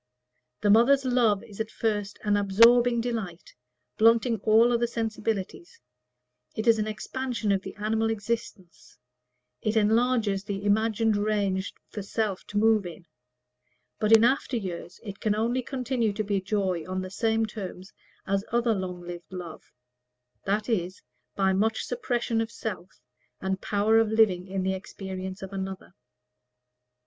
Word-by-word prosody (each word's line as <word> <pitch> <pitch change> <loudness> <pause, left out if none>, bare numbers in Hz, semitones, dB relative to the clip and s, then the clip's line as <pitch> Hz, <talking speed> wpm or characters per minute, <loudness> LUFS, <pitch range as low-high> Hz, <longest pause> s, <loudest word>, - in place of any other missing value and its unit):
The 205 - +4
mother's 265 +5 +5
love 235 -5 +2
is 205 -1 -13
at 220 0 -2
first 205 -3 -2
an 210 -1 +2
absorbing 230 +4 +5
delight, 220 -8 -5 0.5
blunting 230 +1 +4
all 225 +4 +4
other 235 0 +2
sensibilities; 225 - -4 0.8
it 220 - -3
is 230 -2 +5
an 215 - -1
expansion 230 0 -3
of 195 -1 +1
the 195 - -8
animal 220 +2 0
existence; 215 -4 -5 0.6
it 215 +1 0
enlarges 220 -2 +2
the 200 0 -5
imagined 220 +1 +2
range 205 -2 0 0.2
for 210 - -6
self 200 -1 -2
to 205 - -4
move 215 -2 +3
in: 170 0 -11 0.9
but 215 0 +1
in 225 0 +8
after 260 0 +2
years 180 -4 -6
it 200 -3 -8
can 210 -1 +1
only 235 +4 0
continue 250 -4 -1
to 215 +1 -2
be 200 -2 -1
joy 190 -4 -1
on 185 0 -2
the 185 - -7
same 225 +2 +1
terms 195 -3 -8 0.3
as 195 0 0
other 235 0 +2
long 185 -3 -4
lived 175 0 -9
love 175 -3 -9 0.7
that 210 +2 0
is, 185 -5 -2 0.3
by 190 -1 +2
much 220 +3 +1
suppression 240 -2 -1
of 225 - -3
self, 190 -5 -7 0.4
and 190 0 -2
power 215 +2 +3
of 225 - +3
living 205 -5 +3
in 190 0 -2
the 190 0 0
experience 190 0 -7
of 190 +1 -8
another. 190 -1 -6
215 Hz, 150 wpm, -27 LUFS, 195-225 Hz, 0.9 s, in